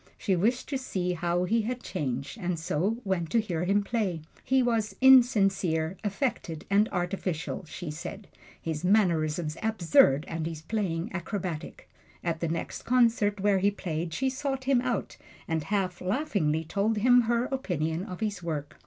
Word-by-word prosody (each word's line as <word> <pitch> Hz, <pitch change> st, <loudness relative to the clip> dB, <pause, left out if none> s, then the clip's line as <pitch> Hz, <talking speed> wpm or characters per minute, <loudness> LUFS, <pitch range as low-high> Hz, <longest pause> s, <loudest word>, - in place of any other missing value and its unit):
She 195 Hz, -4 st, +1 dB
wished 230 Hz, +8 st, +1 dB
to 275 Hz, -3 st, -1 dB
see 180 Hz, -8 st, -2 dB
how 175 Hz, +1 st, 0 dB
he 225 Hz, +5 st, +2 dB
had 245 Hz, +3 st, -4 dB
changed, 140 Hz, -, -4 dB
and 180 Hz, -3 st, -1 dB
so 175 Hz, +7 st, 0 dB
went 180 Hz, -4 st, -1 dB
to 230 Hz, -, +3 dB
hear 180 Hz, -6 st, -2 dB
him 200 Hz, +2 st, +2 dB
play. 200 Hz, -7 st, -1 dB, 0.2 s
He 265 Hz, 0 st, +3 dB
was 225 Hz, -3 st, 0 dB
insincere, 195 Hz, -10 st, +4 dB
affected 200 Hz, -, -2 dB
and 205 Hz, +2 st, +4 dB
artificial, 180 Hz, -2 st, -3 dB
she 165 Hz, 0 st, -6 dB
said 195 Hz, +6 st, -7 dB, 0.3 s
his 160 Hz, -1 st, -4 dB
mannerisms 170 Hz, -5 st, +2 dB
absurd 165 Hz, -9 st, +4 dB
and 165 Hz, -1 st, -3 dB
his 160 Hz, -2 st, -6 dB
playing 175 Hz, -4 st, -2 dB
acrobatic. 185 Hz, -3 st, -5 dB, 0.4 s
At 165 Hz, -2 st, -1 dB
the 170 Hz, -, -1 dB
next 165 Hz, +1 st, -4 dB
concert 230 Hz, -5 st, +2 dB
where 200 Hz, -1 st, +3 dB
he 200 Hz, +2 st, +3 dB
played 170 Hz, -4 st, -4 dB
she 265 Hz, +10 st, -1 dB
sought 270 Hz, 0 st, -3 dB
him 260 Hz, -2 st, +3 dB
out 250 Hz, -1 st, -2 dB, 0.3 s
and 160 Hz, -2 st, -1 dB
half 190 Hz, -3 st, -1 dB
laughingly 185 Hz, -, 0 dB
told 205 Hz, +6 st, 0 dB
him 245 Hz, +3 st, +6 dB
her 240 Hz, +1 st, +2 dB
opinion 175 Hz, -, -2 dB
of 180 Hz, +2 st, -8 dB
his 205 Hz, -4 st, -2 dB
work. 155 Hz, -4 st, -5 dB
190 Hz, 160 wpm, -28 LUFS, 165-225 Hz, 0.4 s, him